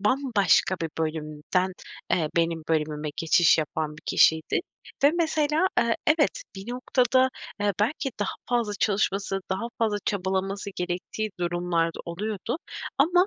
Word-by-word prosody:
bambaşka 210 - +3
bir 160 - -2
bölümden, 160 +4 -1 0.4
eee, 160 -4 +2
benim 165 -1 +1
bölümüme 155 -1 0
geçiş 165 0 +4
yapan 155 -1 -2
bir - - -14
kişiydi. 160 - +4 0.4
Ve 285 - +8
mesela, 315 0 +1
eee, 235 -1 +2
evet 325 +11 +3
bir 195 +5 -6
noktada, 255 +1 +3 0.3
eee, 205 -1 +2
belki 270 +4 0
daha 205 - -1
fazla 235 -4 +1
çalışması 195 -1 +1
daha 195 +5 -1
fazla 220 -3 +1
çabalaması 195 +1 -1
gerektiği 180 +4 -3
durumlar 175 -1 +1
da - - -6
oluyordu. 210 - -3 0.4
Ama 355 +6 +5
195 Hz, 130 wpm, -26 LUFS, 170-245 Hz, 0.4 s, Ve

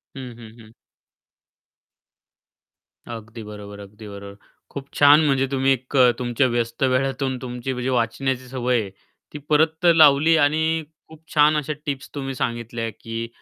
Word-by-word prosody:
हं, 125 -3 -8
हं, 115 0 -13
हं. 110 0 -16 2.4
अगदी 115 0 -9
बरोबर, 105 -1 -10
अगदी 105 +2 -12
बरोबर. 100 0 -10 0.3
खूप 140 0 -8
छान 145 +2 +7
म्हणजे 135 -2 +1
तुम्ही 135 0 +2
एक 130 +2 -3 0.2
तुमच्या 125 +1 +1
व्यस्त 120 0 -2
वेळातून 130 0 0
तुमची 125 +1 -5
म्हणजे 125 +1 -3
वाचण्याची 130 +2 -1
सवय 125 -2 0
आहे 100 - -6 0.4
ती 150 - -5
परत 160 +3 +2
लावली 155 +1 +6
आणि 160 +2 +1 0.2
खूप 160 0 -16
छान 150 0 +4
अशा 150 +1 -2
टिप्स 140 -2 -4
तुम्ही 135 -1 -4
सांगितल्या 115 -1 -3
की 115 0 -5
130 Hz, 140 wpm, -22 LUFS, 115-145 Hz, 2.4 s, छान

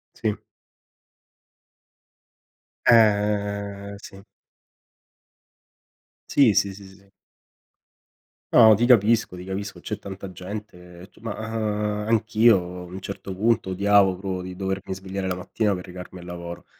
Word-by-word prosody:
Sì. 110 -3 -1 2.5
Ehm, 100 -2 +2
sì. 95 -1 -12 2.1
Sì 125 -7 +5
sì 100 0 +1
sì 100 0 -12
sì. 95 +1 -19 1.4
No, 110 -3 +8
ti 120 +4 +1
capisco 115 -5 +3
ti 90 - -9
capisco, 95 -1 -5
c'è 105 +4 -5
tanta 95 0 -8
gente, 90 -2 -9
tu - - -22
ma 110 -2 -5
a 105 -1 -2
anch'io 110 0 +4 0.2
a - - -8
un 90 +2 -8
certo 100 0 -7
punto 110 0 +1
odiavo 100 0 +3
proprio 95 -1 -4
di 90 0 -8
dovermi 95 0 -3
svegliare 95 0 -5
la 90 - -1
mattina 100 +3 -1
per 90 -1 -6
recarmi 90 0 -10
al 85 - -11
lavoro. 85 0 -8
100 Hz, 120 wpm, -24 LUFS, 95-105 Hz, 2.5 s, No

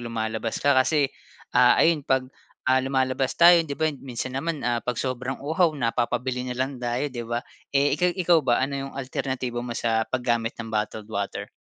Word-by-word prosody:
lumalabas 110 -1 -3
ka 145 - +5
kasi, 140 +1 +2 0.4
ah, 125 0 +6
ayon 165 -2 +4
'pag, 130 -1 +2 0.5
ah, 130 - +5
lumalabas 130 0 0
tayo, 170 0 +8
'di 140 - -4
ba, 160 0 +1
minsan 130 0 -5
naman, 160 +1 -3
ah, 120 -1 +1
pag 125 0 -2
sobrang 130 0 -3
uhaw, 160 +5 +3
napapabili 125 0 -1
na 125 - -3
lang 130 +1 -2
tayo, 125 +4 -1
'di 120 -2 -5
ba? 120 0 -1 0.3
Eh, 140 +1 +3
ikaw 180 0 +3
ikaw 175 -2 +4
ba, 120 +2 +3
ano 140 - -5
'yong 135 0 -6
alternatibo 130 -2 -3
mo 120 -1 -5
sa 110 -1 +1
paggamit 120 -2 -1
ng 115 -1 -7
bottled 105 0 -3
water? 100 -1 -3
130 Hz, 185 wpm, -25 LUFS, 120-140 Hz, 0.5 s, tayo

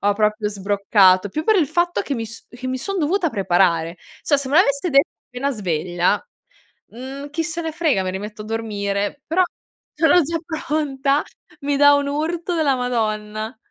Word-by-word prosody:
ho 205 - +4
proprio 210 0 +1
sbroccato 200 -1 +3
più 310 +9 -3
per 435 +2 +4
il 325 - +3
fatto 350 0 +1
che 280 - -3
mi 230 -3 -3
s 230 +1 -11
che 245 +1 -8
mi 260 - -1
son 390 +9 -3
dovuta 335 +2 +1
preparare, 175 -5 +1 0.3
cioè 290 - +3
se 275 -1 -4
me 285 - +2
l'avesse 305 -1 +3
detto 275 +3 +4 0.2
appena 250 +3 -2
sveglia, 175 - -1 0.6
mhmm, 270 +4 -8
chi 325 +1 -1
se 325 +2 -3
ne 325 -1 -3
frega, 310 - +1
mi 185 - -2
rimetto 210 +3 -6
a - - -10
dormire, 210 +2 -2
però 330 +4 +2 0.5
sono 330 +3 +5
già 330 +3 -2
pronta 295 -3 0 0.4
mi 285 0 0
dà 285 0 +7
un 285 0 0
urto 330 +5 -2
della 295 -5 +2
Madonna. 220 -2 -2
260 Hz, 180 wpm, -21 LUFS, 210-310 Hz, 0.6 s, dà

